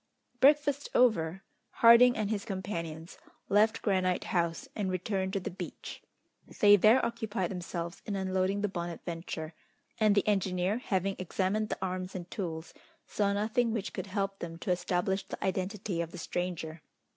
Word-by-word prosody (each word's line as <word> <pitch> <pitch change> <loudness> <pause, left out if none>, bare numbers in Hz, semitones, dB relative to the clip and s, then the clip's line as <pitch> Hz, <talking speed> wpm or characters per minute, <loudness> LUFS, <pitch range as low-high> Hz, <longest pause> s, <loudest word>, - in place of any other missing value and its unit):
Breakfast 285 +1 +4
over, 190 -7 +3 0.3
Harding 235 +1 +7
and 215 -1 -1
his 205 -2 -1
companions 170 -5 -5 0.3
left 215 +2 +3
Granite 185 -3 +1
House 170 -2 -1
and 200 -3 -1
returned 190 +1 -1
to 195 - +1
the 180 - -5
beach. 180 - -8 0.6
They 205 0 +8
there 215 +6 +5
occupied 220 -5 -2
themselves 170 -2 -5
in 205 - -2
unloading 190 +1 0
the 210 - +1
Bonadventure, 170 -3 -5 0.5
and 215 -2 +4
the 200 - +2
engineer, 190 +1 +1
having 195 -4 -1
examined 190 +4 -1
the - - -2
arms 185 0 -3
and 175 -1 -7
tools, 165 -4 -5 0.3
saw 200 -1 0
nothing 220 +3 +1
which 210 -4 -3
could 190 +1 -5
help 195 0 -2
them 165 -1 -6
to 180 - -2
establish 180 +2 0
the - - -6
identity 190 -1 -2
of 165 - -4
the 180 - -10
stranger. 170 -2 -4
190 Hz, 155 wpm, -30 LUFS, 175-210 Hz, 0.6 s, They